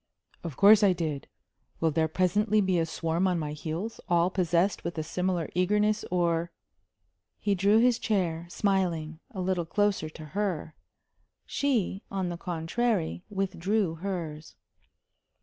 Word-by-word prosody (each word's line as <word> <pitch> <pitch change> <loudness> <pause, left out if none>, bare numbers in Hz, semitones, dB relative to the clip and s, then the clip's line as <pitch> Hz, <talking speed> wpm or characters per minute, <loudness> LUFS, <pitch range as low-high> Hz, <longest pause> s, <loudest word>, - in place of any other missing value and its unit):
"Of 165 -6 -6
course 205 +2 +7
I 200 -3 +5
did. 155 -5 -3 0.5
Will 165 -1 +2
there 160 +1 +1
presently 200 +6 +2
be 190 -3 +2
a 165 - 0
swarm 165 +3 0
on 180 -2 +1
my 150 -2 -3
heels, 165 +8 -5
all 175 +1 +3
possessed 180 +1 +1
with 170 0 -4
a 155 - -1
similar 180 0 -1
eagerness, 210 +4 +2
or 170 -1 +1 0.4
?" - - -51
He 205 - +3
drew 200 +3 +4
his 245 +1 +4
chair, 175 -6 -1
smiling, 175 -5 0
a 215 -8 -8
little 185 -1 0
closer 205 -5 +1
to 155 0 -10
her. 185 -6 -2 0.7
She, 230 -9 0
on 190 -2 -2
the 175 - -4
contrary, 175 +2 -1
withdrew 195 -1 0
hers. 165 -4 -5
180 Hz, 145 wpm, -28 LUFS, 165-200 Hz, 0.7 s, course